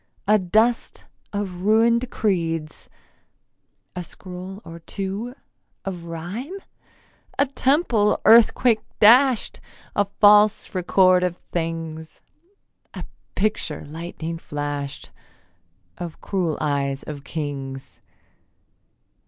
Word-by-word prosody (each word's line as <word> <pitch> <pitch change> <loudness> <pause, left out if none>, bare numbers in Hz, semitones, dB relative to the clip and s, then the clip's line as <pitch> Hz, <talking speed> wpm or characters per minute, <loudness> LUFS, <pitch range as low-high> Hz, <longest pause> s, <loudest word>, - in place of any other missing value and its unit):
A 215 +1 +5
dust 220 +6 +1 0.3
of 195 -4 -4
ruin'd 230 +4 +3
creeds, 165 -6 -2 1.1
A 180 - -4
scroll 185 +2 -9
or 165 0 -9
two 200 +8 -5 0.5
of 180 -3 -5
rhyme? 180 - -6 0.8
A 280 - +4
temple 260 -5 +2
earthquake 230 0 +6 0.2
dasht? 245 +3 +5 0.4
A 205 - +3
false 210 +1 +4
record 185 0 +4
of 180 -1 -1
things? 165 -1 -4 0.7
A - - -6 0.3
picture 190 -7 -1
lightning 165 +1 -6
flasht 145 -2 -5 0.9
Of 170 -2 -6
cruel 180 -6 -1
eyes 140 -2 -1
of 145 -2 -7
kings? 140 -4 -6
180 Hz, 90 wpm, -23 LUFS, 160-215 Hz, 1.1 s, earthquake